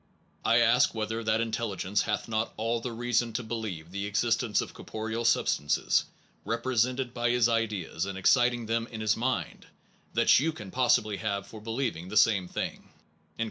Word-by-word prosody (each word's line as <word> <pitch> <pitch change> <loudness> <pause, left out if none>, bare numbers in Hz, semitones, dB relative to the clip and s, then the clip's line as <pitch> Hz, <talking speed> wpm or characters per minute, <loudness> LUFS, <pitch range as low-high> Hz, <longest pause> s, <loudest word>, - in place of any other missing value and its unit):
I - - +4
ask - - +4
whether 110 +1 -2
that 110 +1 +1
intelligence 105 -3 -1
hath 105 -2 -2
not 110 0 -2
all 115 +1 -1
the 125 - -4
reason 120 0 0
to 120 +3 -2
be 110 - -6
lieve 90 -8 -5
the 100 +1 -3
existence 115 +1 +1
of - - -3
corporeal 110 +1 -4
substances, 75 -10 +2 0.4
represented 125 +2 0
by 120 -1 0
his 120 -1 +3
ideas, 105 -6 -1
and 95 -1 -5
exciting 120 +4 +3
them 115 +1 -1
in 110 - -8
his 110 0 +2
mind, 130 +3 -2 0.5
that - - +5
you 160 +4 0
can 105 -7 -9
possibly 110 -5 +2
have 100 -2 -2
for 110 - -11
be 110 - -9
lieving 115 -8 -2
the 105 - -1
same 100 -4 +4
thing. - - -5
115 Hz, 175 wpm, -28 LUFS, 105-120 Hz, 0.5 s, that